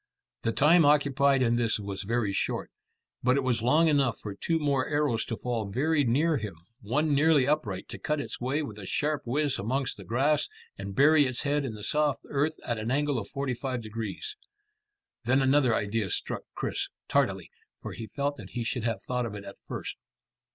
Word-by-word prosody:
The 115 - 0
time 160 +7 +5
occupied 140 -2 +4
in 120 -1 +2
this 115 -2 +1
was 100 -1 -4
very 105 0 0
short, - - -2 0.5
but 125 +2 +3
it 140 - +1
was 125 -3 +1
long 150 +8 +4
enough 140 -6 +2
for 105 - -6
two 165 +11 0
more 140 -4 +1
arrows 145 -7 +1
to 115 - -4
fall 115 -4 -2
very 145 +7 +2
near 145 +6 +2
him, 105 -7 -5 0.3
one 145 +8 +1
nearly 145 -2 +4
upright 115 -11 -1
to - - -7
cut 150 0 -1
its 145 - -5
way 135 +5 0
with 105 -7 -7
a 95 - -8
sharp 150 0 0
whizz 140 +3 0
amongst 130 +6 -1
the 100 - -9
grass 135 - +1 0.3
and 100 0 -7
bury 145 +2 +6
its 130 -2 -3
head 145 0 +1
in 120 -5 -4
the 105 - -9
soft 150 +2 +1
earth 150 +3 +1
at 120 -3 -1
an 110 +2 -3
angle 145 0 +1
of 100 - -7
forty 140 -2 -2
five 125 -1 -3
degrees. 115 - -5 0.9
Then 130 +3 +4
another 135 -3 +4
idea 100 -1 -1
struck - - -3
Chris - - -2 0.2
tardily, - - +1 0.3
for - - -5
he 110 - -7
felt 145 +5 -2
that - - -9
he 120 - -2
should 120 0 -2
have 115 -1 -1
thought 125 -1 -1
of 105 - -7
it 100 - -7
at 100 - -10
first. - - -5
130 Hz, 200 wpm, -28 LUFS, 115-145 Hz, 0.9 s, bury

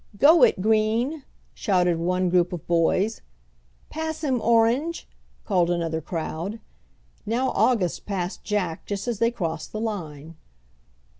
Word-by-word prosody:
"Go 310 - +6
it, - - +5
green!" 220 +8 +1 0.3
shouted 180 -5 +1
one 180 +2 0
group 180 -1 +3
of 170 - -6
boys. 180 +6 +1 0.7
"Pass 315 0 -4
him, 260 -5 0
orange!" 235 +9 +2 0.4
called 180 -4 +2
another 165 -2 -1
crowd. 170 +5 -4 0.6
Now 245 +5 0
August 210 -9 +1
passed 185 -2 -3
Jack 185 -6 -2
just 200 +2 -4
as 235 -4 -2
they 230 - +3
crossed 165 -9 -4
the 215 - -4
line. 165 -8 -5
200 Hz, 130 wpm, -24 LUFS, 175-230 Hz, 0.7 s, Go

